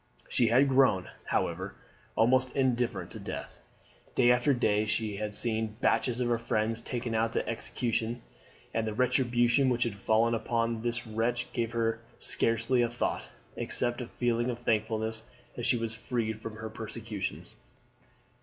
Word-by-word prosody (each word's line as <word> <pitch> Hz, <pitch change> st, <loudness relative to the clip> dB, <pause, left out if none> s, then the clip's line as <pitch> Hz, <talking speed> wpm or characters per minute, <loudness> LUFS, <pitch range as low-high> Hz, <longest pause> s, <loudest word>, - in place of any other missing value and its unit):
She 120 Hz, -, +2 dB
had 125 Hz, +5 st, +5 dB
grown, 130 Hz, -9 st, +3 dB, 0.2 s
however, -, -, -1 dB, 0.4 s
almost 130 Hz, +3 st, +3 dB
indifferent 120 Hz, -8 st, 0 dB
to -, -, -7 dB
death. -, -, -7 dB, 0.6 s
Day 125 Hz, -1 st, +5 dB
after 125 Hz, +3 st, +3 dB
day 110 Hz, -5 st, +2 dB
she 105 Hz, -1 st, -1 dB
had 105 Hz, 0 st, -3 dB
seen 110 Hz, -2 st, 0 dB
batches 125 Hz, -2 st, +2 dB
of 125 Hz, -, +1 dB
her 120 Hz, -1 st, +1 dB
friends 115 Hz, 0 st, 0 dB
taken 120 Hz, -1 st, -3 dB
out 115 Hz, +1 st, +1 dB
to -, -, -1 dB
execution, 115 Hz, 0 st, -2 dB, 0.5 s
and 115 Hz, -1 st, 0 dB
the 110 Hz, -, -3 dB
retribution 125 Hz, +1 st, +3 dB
which 120 Hz, -1 st, +2 dB
had 115 Hz, -, -2 dB
fallen 110 Hz, +4 st, +2 dB
upon 115 Hz, 0 st, 0 dB
this 120 Hz, +1 st, -2 dB
wretch 115 Hz, +2 st, -1 dB
gave 115 Hz, -1 st, -1 dB
her 115 Hz, -1 st, 0 dB, 0.2 s
scarcely 115 Hz, +2 st, +2 dB
a 120 Hz, -, +2 dB
thought, 120 Hz, +1 st, -2 dB, 0.3 s
except 120 Hz, +1 st, +1 dB
a 120 Hz, -, -5 dB
feeling 120 Hz, 0 st, 0 dB
of 120 Hz, -, -2 dB
thankfulness 110 Hz, -1 st, 0 dB, 0.3 s
that 120 Hz, -, -2 dB
she 120 Hz, -, +3 dB
was 115 Hz, -1 st, -2 dB
freed 110 Hz, -1 st, -3 dB
from 115 Hz, -, -6 dB
his 110 Hz, 0 st, -6 dB
persecutions. 110 Hz, -2 st, -5 dB
115 Hz, 155 wpm, -30 LUFS, 110-120 Hz, 0.6 s, had